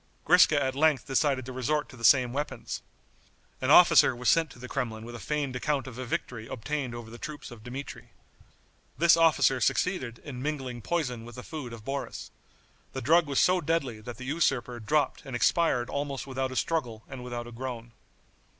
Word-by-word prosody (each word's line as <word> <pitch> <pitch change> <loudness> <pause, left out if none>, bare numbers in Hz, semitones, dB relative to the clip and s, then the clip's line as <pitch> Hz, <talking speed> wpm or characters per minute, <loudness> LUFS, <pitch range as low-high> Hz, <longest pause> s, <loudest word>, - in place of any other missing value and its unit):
Griska 160 -3 +6
at 130 -2 0
length 150 0 +2
decided 135 -1 +1
to 130 - -7
resort 145 +4 -1
to - - -12
the 115 - -12
same 125 -1 +5
weapons. 145 +2 -4 0.8
An - - 0
officer - - +7
was 125 0 0
sent 165 -1 +3
to 135 - -14
the 125 +1 -8
Kremlin 115 -5 -3
with 120 - -8
a 120 - -7
feigned 145 -2 -2
account 140 +1 -1
of 130 -2 -9
a 130 - -4
victory 115 -1 -4
obtained 130 0 -4
over 115 -1 -8
the 120 - -10
troops 150 -3 -7
of 115 -3 -12
Dmitri. 130 +3 -8 0.9
This 170 0 +6
officer 145 -6 +4
succeeded 130 -11 0
in 130 -4 -7
mingling 130 -4 -4
poison 125 -7 -2
with 120 0 -11
the 125 - -8
food 150 -6 -7
of 115 -2 -10
Boris. 140 +1 -5 0.6
The 130 - -4
drug 165 +1 +4
was 140 -2 -2
so 180 0 +4
deadly 140 -9 -1
that 120 +2 -8
the 130 - -8
usurper 130 -5 0
dropped 145 +7 0
and 135 - -6
expired 125 -2 +2
almost 140 -1 -3
without 130 -1 -3
a - - -6
struggle 125 -9 -1
and 130 -2 -8
without 120 -1 -5
a 120 - -10
groan. 120 -1 -6
130 Hz, 195 wpm, -28 LUFS, 120-150 Hz, 0.9 s, officer